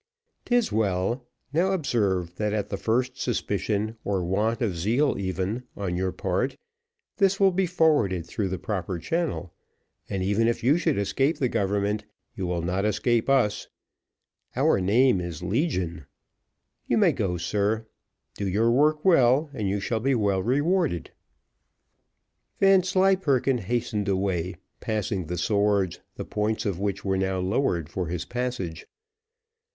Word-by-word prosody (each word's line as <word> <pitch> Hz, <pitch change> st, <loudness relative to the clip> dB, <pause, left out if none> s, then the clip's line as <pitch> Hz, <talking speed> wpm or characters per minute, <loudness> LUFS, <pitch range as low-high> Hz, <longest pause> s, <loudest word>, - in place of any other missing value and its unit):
"'Tis 245 Hz, -2 st, +2 dB
well: 110 Hz, +4 st, 0 dB, 0.3 s
now, 180 Hz, +5 st, +2 dB
observe, 100 Hz, -, 0 dB
that 105 Hz, -1 st, -1 dB
at 105 Hz, -2 st, -2 dB
the -, -, -2 dB
first 125 Hz, +5 st, -1 dB
suspicion, 110 Hz, -1 st, -1 dB
or 95 Hz, -3 st, -1 dB
want 105 Hz, +7 st, 0 dB
of 110 Hz, -8 st, -1 dB
zeal, 115 Hz, -, +1 dB
even, 95 Hz, +4 st, -2 dB, 0.2 s
on 95 Hz, -3 st, -2 dB
your 95 Hz, +1 st, -1 dB
part, 95 Hz, +10 st, -1 dB, 0.6 s
this 195 Hz, -1 st, +3 dB
will 195 Hz, -1 st, +5 dB
be 185 Hz, +1 st, +1 dB
forwarded 145 Hz, -, +2 dB
through 100 Hz, +2 st, -2 dB
the 95 Hz, 0 st, -3 dB
proper 95 Hz, -3 st, -3 dB
channel, 165 Hz, -, -2 dB, 0.6 s
and 95 Hz, -1 st, -2 dB
even 105 Hz, +4 st, +2 dB
if 115 Hz, -, -1 dB
you 135 Hz, +5 st, +5 dB
should 160 Hz, -4 st, +1 dB
escape 120 Hz, -, +1 dB
the 130 Hz, -, +1 dB
government, 105 Hz, -1 st, 0 dB, 0.3 s
you 95 Hz, -5 st, -3 dB
will 85 Hz, -1 st, -2 dB
not 90 Hz, +3 st, -1 dB
escape 110 Hz, +4 st, +1 dB
us: 125 Hz, -7 st, +2 dB, 0.9 s
our -, -, +3 dB
name 110 Hz, +2 st, +3 dB
is 85 Hz, -1 st, -6 dB
Legion. 90 Hz, -, -1 dB, 0.8 s
You -, -, +2 dB
may -, -, +5 dB
go, 90 Hz, -2 st, -1 dB
sir; 105 Hz, +5 st, 0 dB, 0.5 s
do 100 Hz, -, -3 dB
your 110 Hz, +5 st, +2 dB
work 150 Hz, +5 st, +2 dB
well, 145 Hz, -3 st, +4 dB
and 105 Hz, -6 st, -2 dB
you 100 Hz, +1 st, 0 dB
shall 110 Hz, +3 st, -1 dB
be 135 Hz, +4 st, +1 dB
well 100 Hz, -4 st, +1 dB
rewarded." 145 Hz, -, 0 dB, 1.5 s
Vanslyperken 185 Hz, -9 st, +3 dB
hastened 110 Hz, -1 st, -2 dB
away, 95 Hz, -2 st, -1 dB, 0.2 s
passing 100 Hz, -5 st, -2 dB
the 90 Hz, +1 st, -3 dB
swords, 100 Hz, 0 st, +1 dB, 0.2 s
the -, -, -6 dB
points 110 Hz, +2 st, -1 dB
of 95 Hz, -4 st, -1 dB
which 100 Hz, -1 st, -2 dB
were 95 Hz, -1 st, +1 dB
now 95 Hz, 0 st, 0 dB
lowered 90 Hz, -, 0 dB
for 90 Hz, +1 st, -3 dB
his 85 Hz, 0 st, -3 dB
passage. 120 Hz, -10 st, -4 dB
105 Hz, 145 wpm, -26 LUFS, 95-130 Hz, 1.5 s, will